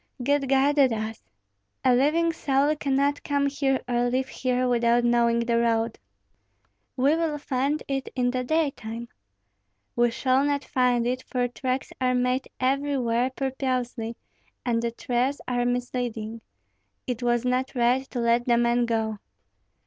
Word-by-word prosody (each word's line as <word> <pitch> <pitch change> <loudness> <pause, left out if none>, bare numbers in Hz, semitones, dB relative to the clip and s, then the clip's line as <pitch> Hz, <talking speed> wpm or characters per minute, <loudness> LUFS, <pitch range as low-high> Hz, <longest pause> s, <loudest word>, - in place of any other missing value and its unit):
"God 280 0 +1
guided 275 0 +4
us. 220 0 -4 0.6
A 255 - +6
living 315 +6 +2
soul 285 0 +1
cannot 280 0 0
come 285 -1 +1
here 275 -1 0
or 245 0 +1
leave 260 +2 -1
here 255 -1 0
without 240 0 +3
knowing 235 -1 +3
the 235 0 +1
road." 230 -1 0 1.0
"We 275 +4 +3
will 325 -2 -1
find 280 +1 -1
it 270 -1 -2
in 245 -1 +1
the 255 0 -2
daytime." 245 -6 -2 0.9
"We 240 0 +3
shall 260 +3 +1
not 285 0 0
find 250 -2 +1
it, 250 +1 -1
for 250 -1 0
tracks 255 +2 -3
are 255 0 +2
made 250 +1 0
everywhere 255 -2 +1
purposely, 255 -3 -3 0.5
and 230 -2 +1
the 235 - 0
trails 245 +4 -1
are 245 -1 0
misleading. 240 -3 -3 0.6
It 250 -1 -3
was 240 0 +1
not 255 +2 0
right 245 +2 +2
to 250 - -4
let 235 +1 +2
the 240 -1 +4
man 240 0 +2
go." 220 -2 -1
250 Hz, 145 wpm, -26 LUFS, 235-270 Hz, 1.0 s, A